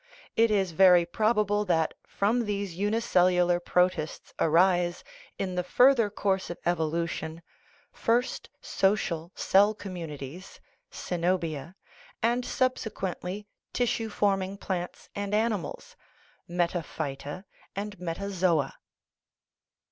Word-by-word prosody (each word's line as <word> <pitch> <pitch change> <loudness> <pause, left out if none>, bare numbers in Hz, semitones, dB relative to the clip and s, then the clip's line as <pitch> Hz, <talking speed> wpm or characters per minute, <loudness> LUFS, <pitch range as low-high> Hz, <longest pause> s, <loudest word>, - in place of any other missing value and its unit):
It 230 0 +4
is 195 -4 +1
very 180 0 +6
probable 210 +2 +1
that 160 -4 +1
from 225 +4 +1
these 200 -3 -2
unicellular 180 -3 +2
protists 180 -3 0
arise, 175 +1 +3 0.3
in 185 -1 -2
the 180 0 -1
further 240 +3 +5
course 195 -2 -1
of 175 - -5
evolution, 165 -1 -1 0.5
first 240 +3 0
social 175 -4 0
cell 205 +3 +4
communities 170 -3 -8 0.3
(ccenobia), 170 -2 -2 0.5
and 240 +2 +2
subsequently 210 -6 -2 0.3
tissue 230 -2 0
forming 195 -2 0
plants 180 -3 -4
and 200 0 -2
animals 215 -7 -2 0.5
(metaphyta 170 -2 -3 0.3
and 205 -1 -5
metazoa). 180 -4 0
185 Hz, 95 wpm, -28 LUFS, 170-205 Hz, 0.5 s, very